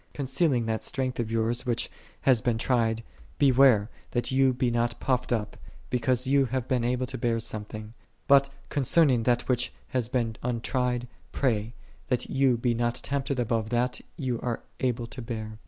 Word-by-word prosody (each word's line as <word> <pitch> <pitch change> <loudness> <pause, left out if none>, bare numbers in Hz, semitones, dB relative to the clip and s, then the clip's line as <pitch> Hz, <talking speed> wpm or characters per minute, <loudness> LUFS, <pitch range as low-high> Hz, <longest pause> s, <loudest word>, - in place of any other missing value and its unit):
Concerning 135 -2 +1
that 110 0 -1
strength 130 -2 -2
of 115 -2 -1
yours 115 +1 +1
which 120 -3 -1 0.3
hath 125 -5 +3
been 120 -2 +1
tried 115 -2 +1 0.3
beware, 130 -6 +5 0.2
that 120 +1 -1
ye 135 0 +4
be 125 -1 0
not 120 0 0
puffed 125 -1 0
up, 110 -3 -1 0.4
because 125 0 +1
ye 140 +1 +4
have 130 0 -2
been 125 -2 +1
able 125 +1 0
to 130 +1 -6
bear 115 -2 +1
something: 110 0 -4 0.3
but 140 0 +6 0.2
concerning 140 -2 +3
that 120 +1 +1
which 125 -1 +1 0.2
hath 125 -2 -2
been 115 -3 0
untried, 125 0 -1 0.2
pray, 115 -3 0 0.3
that 125 - -1
ye 135 -1 +3
be 120 +1 0
not 120 0 0
tempted 140 -1 -2
above 115 -2 0
that 125 +1 0 0.2
ye 130 -6 -1
are 120 -2 -3 0.2
able 120 -2 0
to 125 +2 -8
bear. 110 -2 -6
125 Hz, 170 wpm, -27 LUFS, 115-130 Hz, 0.4 s, but